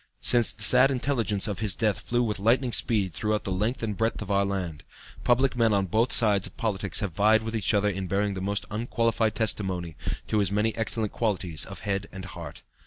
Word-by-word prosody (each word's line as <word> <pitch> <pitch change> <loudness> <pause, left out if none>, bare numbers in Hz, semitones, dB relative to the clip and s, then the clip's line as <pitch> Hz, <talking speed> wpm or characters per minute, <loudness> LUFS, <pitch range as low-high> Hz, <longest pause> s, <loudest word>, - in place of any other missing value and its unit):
Since 120 -2 +5
the 105 - -8
sad 130 +5 +7
intelligence 120 -7 +1
of 100 -3 -4
his 105 -5 0
death 105 -2 0
flew 120 0 -1
with 105 -3 -2
lightning 120 +5 +1
speed 100 -7 +1
throughout 105 +3 -2
the 95 - -4
length 110 +7 -2
and 105 -2 -2
breadth 115 +3 -1
of 100 - -7
our 100 0 +2
land, 90 -6 -4 0.4
public 130 +2 +2
men 115 -2 +2
on 100 -1 +1
both 110 +7 0
sides 105 -4 +5
of - - -17
politics 105 -2 0
have 100 -5 -3
vied 110 +4 +3
with 110 +1 -5
each 110 -4 0
other 105 -1 +1
in 95 -2 -3
bearing 100 +2 -1
the 95 - -6
most 100 +1 -2
unqualified 115 0 -1
testimony 95 -6 -2 0.3
to 110 - -1
his 100 -1 +1
many 105 +2 0
excellent 110 -1 -1
qualities 90 -8 -1
of 100 - -9
head 100 -1 -3
and 95 0 -9
heart. - - -10
105 Hz, 215 wpm, -26 LUFS, 100-115 Hz, 0.4 s, sad